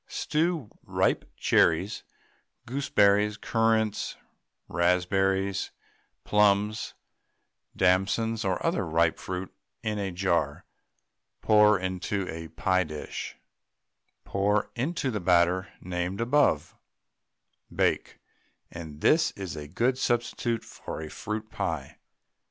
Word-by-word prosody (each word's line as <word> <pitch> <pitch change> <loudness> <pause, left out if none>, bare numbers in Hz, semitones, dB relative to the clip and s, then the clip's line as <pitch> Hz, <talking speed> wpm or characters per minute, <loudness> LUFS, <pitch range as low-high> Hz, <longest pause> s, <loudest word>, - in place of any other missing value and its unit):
Stew 160 -6 -1
ripe - - 0
cherries, - - +2 0.6
gooseberries, 105 -5 +2
currants, 110 -1 0 0.5
raspberries, 95 +2 +1 0.5
plums, 105 +1 +2 0.8
damsons, 100 +5 +2
or 95 -3 -1
other - - +1
ripe 80 +1 +1
fruit 95 0 -5 0.3
in 105 -1 -1
a 100 -1 -1
jar, 85 -5 0 0.8
pour 105 -1 +6
into 95 +1 -2
a 80 0 -6
pie 95 +3 +1
dish; 75 -2 -6 0.9
pour 100 +1 +1
into 135 +2 -1
the 105 - -2
batter 90 +1 +3
named 90 +2 -3
above, 115 - +2 1.0
bake, - - 0 0.5
and 80 -3 -9
this 160 +1 +4
is 95 -4 -6
a 75 -1 -7
good 120 - 0
substitute 120 -1 0
for - - -8
a 80 -1 -7
fruit 110 +1 -5
pie. 75 -5 -4
100 Hz, 100 wpm, -27 LUFS, 90-110 Hz, 1.0 s, pour